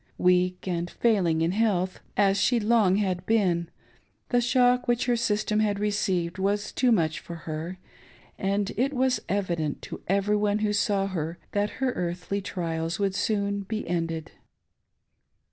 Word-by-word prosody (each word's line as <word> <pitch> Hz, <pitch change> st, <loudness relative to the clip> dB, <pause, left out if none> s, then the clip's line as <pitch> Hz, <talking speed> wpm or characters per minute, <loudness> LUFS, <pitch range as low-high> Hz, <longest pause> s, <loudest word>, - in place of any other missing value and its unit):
Weak 180 Hz, +1 st, +2 dB
and 175 Hz, -1 st, -2 dB
failing 180 Hz, -9 st, +2 dB
in 165 Hz, +1 st, +2 dB
health, 190 Hz, -3 st, 0 dB, 0.2 s
as 195 Hz, -1 st, +3 dB
she 235 Hz, +6 st, +3 dB
long 215 Hz, -4 st, +3 dB
had 190 Hz, -3 st, 0 dB
been, 180 Hz, -7 st, +2 dB, 0.6 s
the 245 Hz, -1 st, +3 dB
shock 245 Hz, 0 st, +3 dB
which 240 Hz, 0 st, +1 dB
her 245 Hz, -1 st, +2 dB
system 215 Hz, -2 st, 0 dB
had 210 Hz, -2 st, +1 dB
received 190 Hz, -4 st, -1 dB
was 205 Hz, +2 st, 0 dB
too 250 Hz, -1 st, +2 dB
much 160 Hz, -7 st, +2 dB
for 170 Hz, -, -8 dB
her, 160 Hz, +3 st, -4 dB, 0.6 s
and 200 Hz, +1 st, -1 dB
it 270 Hz, +5 st, +1 dB
was 260 Hz, 0 st, +2 dB
evident 170 Hz, -6 st, -1 dB
to -, -, -7 dB
every 200 Hz, +2 st, +2 dB
one 205 Hz, 0 st, +1 dB
who 210 Hz, -1 st, 0 dB
saw 200 Hz, -1 st, +1 dB
her 170 Hz, -3 st, -3 dB
that 205 Hz, 0 st, 0 dB, 0.2 s
her 255 Hz, -, +2 dB
earthly 180 Hz, +1 st, -3 dB
trials 165 Hz, -3 st, -3 dB
would 200 Hz, -2 st, 0 dB
soon 200 Hz, 0 st, 0 dB
be 215 Hz, +2 st, -4 dB
ended. 165 Hz, -2 st, -2 dB
200 Hz, 155 wpm, -26 LUFS, 175-215 Hz, 0.6 s, as